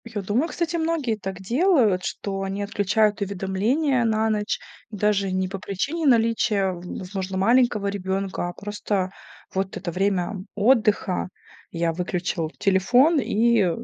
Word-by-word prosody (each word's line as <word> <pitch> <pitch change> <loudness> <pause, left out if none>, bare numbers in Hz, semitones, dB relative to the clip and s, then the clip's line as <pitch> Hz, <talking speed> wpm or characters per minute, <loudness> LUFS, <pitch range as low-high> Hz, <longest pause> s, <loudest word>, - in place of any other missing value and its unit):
Я 220 -3 -4
думаю, 230 - +1
кстати, 340 0 -2
многие 320 -8 0
так 195 -2 -6
делают, 235 - +3
что 195 -1 -4
они 195 +1 -3
отключают 205 +1 +1
уведомления 205 - 0
на 220 -1 +1
ночь 210 0 -1 0.3
даже 205 -2 0
не 185 0 0
по 195 +1 -6
причине 285 - -2
наличия, 225 -5 +3
в 175 -1 -8 0.2
возможно, 190 0 -4
маленького 230 +1 +3
ребёнка, 195 -2 -2
а - - -7
просто 205 -1 -3 0.4
вот 190 0 -2
это 175 -2 -4
время 195 +2 0 0.2
отдыха: 210 -5 +2 0.4
я 165 -1 0
выключил 175 -1 -2
телефон, 245 - +4
и 230 -5 +2
205 Hz, 135 wpm, -24 LUFS, 190-230 Hz, 0.4 s, телефон